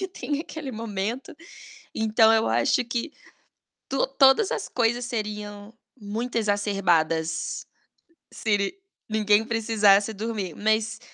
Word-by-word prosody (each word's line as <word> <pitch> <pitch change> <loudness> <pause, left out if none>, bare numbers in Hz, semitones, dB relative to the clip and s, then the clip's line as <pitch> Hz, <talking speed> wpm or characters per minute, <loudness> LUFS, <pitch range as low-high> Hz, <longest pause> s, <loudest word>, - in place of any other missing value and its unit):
e 380 - -3
tem 295 -5 -4
aquele 305 -4 -7
momento. 225 - -4 0.6
Então 220 0 +4
eu 220 0 +2
acho 120 - +2
que 245 +5 -3 0.8
to-todas 270 +6 +3
as - - -2
coisas 240 0 0
seriam 210 -2 -5 0.3
muito 225 +4 -5
exacerbadas 180 -7 0 0.7
se 210 -2 0
ni 200 - -2 0.3
ninguém 215 -1 +3
precisasse 220 -3 +3
dormir. 210 -4 -4
Mas 215 +1 0
220 Hz, 110 wpm, -25 LUFS, 205-240 Hz, 0.8 s, Então